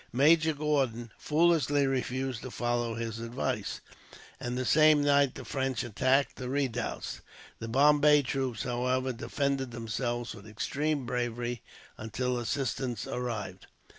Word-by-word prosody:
Major 155 +5 +4
Gordon 135 -6 0
foolishly 150 -3 +3
refused 130 -2 -2
to 130 - -6
follow 120 -1 -1
his 115 -1 -4
advice, 115 +1 -3 0.6
and 120 0 -3
the 130 - -1
same 155 +1 +5
night 140 -2 +3
the - - -8
French 130 -3 -1
attacked 130 +4 +1
the 125 -1 -5
redoubts. 130 -4 -2 0.4
The 115 - -5
Bombay 145 +3 +5
troops, 130 -2 -2
however, 125 +1 0
defended 135 +3 -1
themselves 120 +1 -3
with 105 -1 -12
extreme 145 +6 -2
bravery 120 0 -2 0.4
until 125 +3 -2
assistance 120 -1 -2
arrived. 110 -7 -4
125 Hz, 125 wpm, -30 LUFS, 120-140 Hz, 0.6 s, same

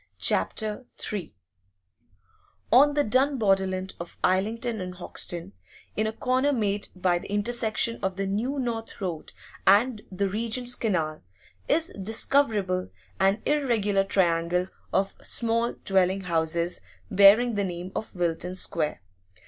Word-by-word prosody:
CHAPTER 220 +3 +1 0.3
III 190 -6 -4 1.4
On 285 +4 +6
the 290 - +3
dun 265 +5 +2
borderland 190 -3 +1
of 170 0 -8
Islington 220 +4 0
and 180 0 -6
Hoxton, 175 - -3 0.4
in 215 +1 +1
a - - -1
corner 255 +5 +1
made 210 -5 -1
by 180 -1 +1
the - - -9
intersection 230 +2 0
of 190 -1 -1
the 195 +1 -2
New 225 +9 -1
North 235 -4 -4
Road 175 -6 -4 0.4
and 215 +3 +4
the 195 +1 0
Regent's 235 +5 0
Canal, 165 - -1 0.4
is 325 +1 +1
discoverable 210 -4 +1 0.3
an 195 +3 +2
irregular 230 -9 +1
triangle 180 -1 +1 0.2
of 195 0 0
small 230 0 0
dwelling 190 0 +3
houses, 170 0 -1 0.3
bearing 205 +5 +6
the 205 -1 0
name 180 0 -5
of 220 - -5
Wilton 175 +1 -1
Square. 160 - -1
200 Hz, 125 wpm, -26 LUFS, 185-230 Hz, 1.4 s, On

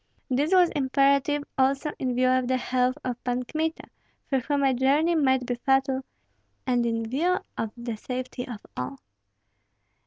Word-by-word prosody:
This 285 +6 +1
was 365 -2 +5
imperative 280 +1 +2 0.2
also 275 +3 +2
in 255 -2 -1
view 255 +1 +3
of 255 -1 +2
the 260 0 +2
health 255 +1 0
of 250 -1 -4
Pan 250 0 -1
Kmita, 315 +5 -2 0.4
for 270 - +1
whom 285 +2 0
a 270 -1 +4
journey 280 +7 +3
might 265 -5 +2
be 245 - -1
fatal, 270 +2 +1 0.6
and 245 -2 +1
in 230 -1 -1
view 335 +10 +1 0.2
of 225 - -2
the 235 -1 -4
safety 250 +2 -5
of 235 -5 -7
all. 125 +2 -4
260 Hz, 160 wpm, -26 LUFS, 250-280 Hz, 0.6 s, was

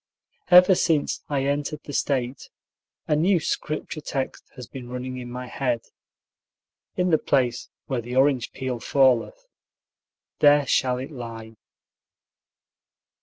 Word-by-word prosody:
Ever 180 +1 +8
since 165 -4 +1
I 140 -2 0
entered 145 +1 -2
the 145 - -8
State 130 -2 -2 0.6
a 150 - +2
new 175 +4 +3
Scrip 155 0 -3
ture 155 - -6
text 135 -2 -4
has 125 -2 -8
been 125 -1 -10
running 125 +1 -5
in 125 -1 -7
my 125 +1 -6
head: 125 -1 -2 1.1
In 180 -1 +1
the 155 - +4
place 125 -3 0 0.2
where 130 -3 -2
the 120 +2 -6
orange 130 -2 +2
peel 130 -2 -4
falleth, 135 - +2 0.9
there 145 -1 +5
shall 125 0 +1
it 130 +4 -6
lie. 115 -4 -8
135 Hz, 130 wpm, -24 LUFS, 125-150 Hz, 1.1 s, Ever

